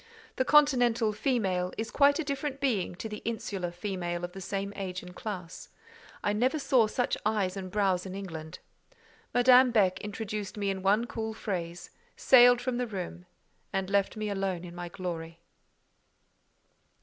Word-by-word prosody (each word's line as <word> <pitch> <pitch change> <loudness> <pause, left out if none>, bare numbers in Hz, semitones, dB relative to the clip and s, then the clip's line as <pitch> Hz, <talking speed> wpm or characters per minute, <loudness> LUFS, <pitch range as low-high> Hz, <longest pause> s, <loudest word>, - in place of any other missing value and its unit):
The 260 - +2
continental 245 -7 +4
"female" 195 -7 0
is 220 +1 -3
quite 285 0 +4
a 325 - -1
different 280 -1 -3
being 230 -11 0
to 200 - -6
the 210 -1 -7
insular 215 -5 -3
"female" 175 -1 -4
of 175 - -4
the 195 +1 -9
same 200 +2 -3
age 185 -2 -5
and 180 0 -11
class: 185 -6 -7 0.5
I 205 - +1
never 255 +8 +1
saw 255 -6 +3
such 245 +3 0
eyes 205 -3 0
and 190 -1 -5
brows 190 -2 +1
in 190 - -7
England. 160 -5 -7 0.7
Madame 250 +1 +6
Beck 200 -6 +2
introduced 210 -1 -5
me 200 -1 0
in 190 -1 -4
one 205 +5 +3
cool 220 -2 -4
phrase, 175 -5 -5 0.2
sailed 245 -1 +6
from 245 -1 -2
the 250 0 -1
room, 180 -3 -6 0.4
and 195 -1 -2
left 200 +1 +1
me 215 -1 -2
alone 195 -3 -2
in 170 - -9
my 175 0 -6
glory. 165 -2 -6
200 Hz, 160 wpm, -29 LUFS, 185-235 Hz, 0.7 s, Madame